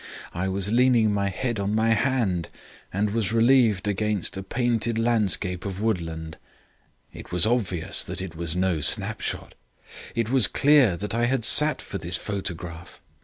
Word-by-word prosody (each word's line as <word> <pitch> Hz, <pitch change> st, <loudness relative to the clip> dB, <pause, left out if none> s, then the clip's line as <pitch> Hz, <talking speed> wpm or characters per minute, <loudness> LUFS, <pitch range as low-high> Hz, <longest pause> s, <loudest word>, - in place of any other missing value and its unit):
I 95 Hz, +3 st, -2 dB
was 100 Hz, +1 st, -2 dB
leaning 120 Hz, -3 st, +3 dB
my 100 Hz, -1 st, 0 dB
head 120 Hz, +3 st, -3 dB
on 100 Hz, +1 st, -1 dB
my 110 Hz, +1 st, +1 dB
hand 115 Hz, -8 st, 0 dB, 0.4 s
and 100 Hz, +2 st, -1 dB
was 110 Hz, -3 st, -1 dB
relieved 115 Hz, -4 st, +3 dB
against 105 Hz, -1 st, -1 dB
a 95 Hz, -, -5 dB
painted 115 Hz, +1 st, -1 dB
landscape 105 Hz, -6 st, 0 dB
of 95 Hz, -1 st, -5 dB
woodland. 80 Hz, -7 st, -3 dB, 0.7 s
It -, -, -11 dB
was 90 Hz, -1 st, +5 dB
obvious 100 Hz, -6 st, 0 dB
that 90 Hz, +1 st, -6 dB
it 95 Hz, -3 st, -7 dB
was 85 Hz, 0 st, -3 dB
no 90 Hz, -3 st, 0 dB
snapshot; -, -, +1 dB, 0.6 s
it 115 Hz, 0 st, -1 dB
was 130 Hz, -7 st, +6 dB
clear 135 Hz, -10 st, +3 dB
that 105 Hz, +4 st, -5 dB
I 120 Hz, +1 st, +1 dB
had 125 Hz, -3 st, -1 dB
sat 150 Hz, +4 st, +3 dB
for 100 Hz, -, -6 dB
this 85 Hz, +2 st, 0 dB
photograph. 85 Hz, -4 st, -6 dB
105 Hz, 160 wpm, -24 LUFS, 90-115 Hz, 0.7 s, was